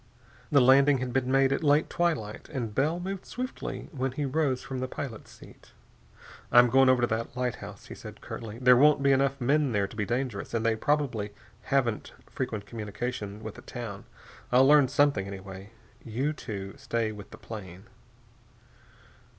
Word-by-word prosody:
The 140 - +6
landing 135 +2 +6
had 125 -1 -4
been 130 -1 0
made 135 0 +4
at 140 - -2
late 145 +1 +4
twilight, 140 -12 -2
and 120 -7 -4
Bell 155 +8 +1
moved 190 +1 -5
stiffly 255 +2 -5
when 135 -4 -2
he 145 +1 -2
rose 135 -2 0
from 130 -1 -5
the 130 - -2
pilot's 130 -4 -7
seat. - - -16 0.8
"I'm 120 -1 +7
going 135 0 +6
over 130 -1 +4
to 120 - +3
that 115 +2 -3
lighthouse," 125 -2 -4
he - - -9
said - - -10
curtly. 110 -1 -7
"There 125 0 +6
won't 145 +2 +5
be 140 - +5
enough 135 0 +2
men 140 +1 +2
there 100 -2 +2
to 95 - -13
be 105 - -1
dangerous 120 -3 -2
and 115 0 -1
they 115 -1 +3
probably 115 -6 -1 0.3
haven't 120 -6 0
frequent 110 -5 -4
communication 105 -1 -5
with 110 -2 -6
the - - -12
town. - - -7 0.5
I'll 130 +2 +6
learn 145 -1 +6
something, 140 -7 +2
anyway. 95 0 -9 0.3
You 130 +7 -1
two 100 -9 -6
stay 115 -2 -1
with 105 -1 -10
the - - -11
plane." 95 -4 -9
125 Hz, 175 wpm, -28 LUFS, 110-140 Hz, 0.8 s, I'm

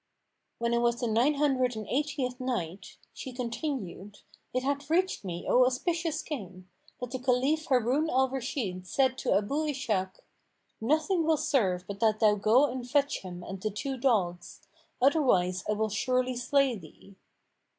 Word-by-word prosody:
When 235 0 0
it 235 - +3
was 235 0 +1
the 245 - -1
Nine 240 +7 +3
Hundred 260 -4 +1
and 215 -1 -5
Eightieth 270 -2 -1
Night, 195 -8 -4 0.2
She 260 - -7
continued, 235 - -5 0.3
It 255 - -1
hath 280 +1 -2
reached 365 - +1
me, 175 -2 -5
O 255 - +5
auspicious 320 +5 0
King, 190 - -7 0.3
that 250 -1 -5
the 260 - -3
Caliph 265 +5 +1
Harun 260 +5 +2
al 265 -1 +3
Rashid 240 - -4
said 260 +5 +2
to - - +1
Abu 280 +10 -1
Ishak, 215 -10 -2 0.6
"Nothing 315 - +2
will 320 0 +3
serve 190 -12 +1
but 200 0 -7
that 215 -1 +2
thou 215 -1 +5
go 215 +7 +4
and 250 -2 -5
fetch 285 0 +2
him 180 -2 -8
and 190 0 -7
the 215 - -1
two 265 +7 -4
dogs; 195 -10 0 0.4
otherwise 245 - +3
I - - +3
will 215 +1 0
surely 255 +4 0
slay 265 +1 +2
thee." 195 +2 -14
250 Hz, 160 wpm, -29 LUFS, 205-275 Hz, 0.6 s, O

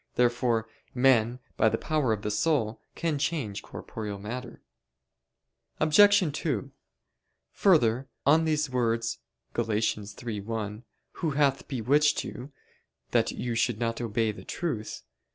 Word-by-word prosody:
Therefore 120 -2 +2 0.3
men, 125 -2 +4 0.2
by 110 - +5
the - - 0
power 150 -7 0
of 105 -2 -1
the 105 - -1
soul, 110 -1 0
can 160 -4 -1
change 140 -9 -2
corporeal 105 -2 -6
matter. 120 +5 -7 1.2
Obj. 205 +7 +6
2: 135 - -2 0.8
Further, 135 - +3 0.2
on 155 +4 +5
these 155 -1 +1
words 115 -2 0 0.3
(Gal. 120 - 0
3:1): 105 0 -3 0.4
"Who 165 - 0
hath 140 -2 +1
bewitched 145 +4 +2
you, 130 +4 -8 0.6
that - - +3
you 120 -1 -3
should 115 -1 +1
not 115 0 -2
obey 115 -1 0
the 105 - -11
truth?" 125 -12 -4
120 Hz, 120 wpm, -28 LUFS, 110-145 Hz, 1.2 s, Obj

